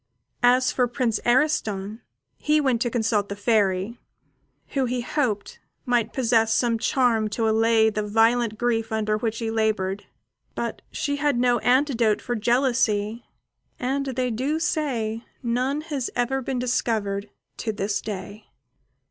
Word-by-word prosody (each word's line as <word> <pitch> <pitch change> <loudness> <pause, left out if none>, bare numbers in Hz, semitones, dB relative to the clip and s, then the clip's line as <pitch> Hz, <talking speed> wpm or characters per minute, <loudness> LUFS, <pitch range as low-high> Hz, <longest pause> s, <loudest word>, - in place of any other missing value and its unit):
As 250 +1 +4
for 250 -1 +1
Prince 240 -2 -1
Ariston, 225 -6 +1 0.4
he 300 0 +2
went 260 -5 +1
to 240 - +1
consult 220 -3 0
the 200 - -4
Fairy, 205 0 +1 0.7
who, 270 -2 0
he 250 0 -1
hoped, 240 -5 -2 0.3
might 240 -3 +1
possess 230 -3 +2
some 230 0 +2
charm 230 -3 +2
to 225 +2 -1
allay 220 0 +4
the 210 - -2
violent 225 +1 +2
grief 225 -2 0
under 215 -1 0
which 225 +1 -2
he 225 -1 -2
laboured; 210 -3 -1 0.5
but - - -4
she 285 -1 -2
had 290 -3 +1
no 245 -1 +3
antidote 245 -4 +2
for 245 - -3
jealousy, 235 -2 +1 0.5
and 275 +2 -1
they 255 -1 -1
do 265 +7 -1
say 235 -9 -1 0.2
none 255 +5 0
has 290 -5 -3
ever 255 +2 0
been 260 0 -3
discovered 215 -5 -1 0.3
to 225 - -2
this 205 -1 -2
day. 205 +1 -7
235 Hz, 140 wpm, -24 LUFS, 215-255 Hz, 0.7 s, As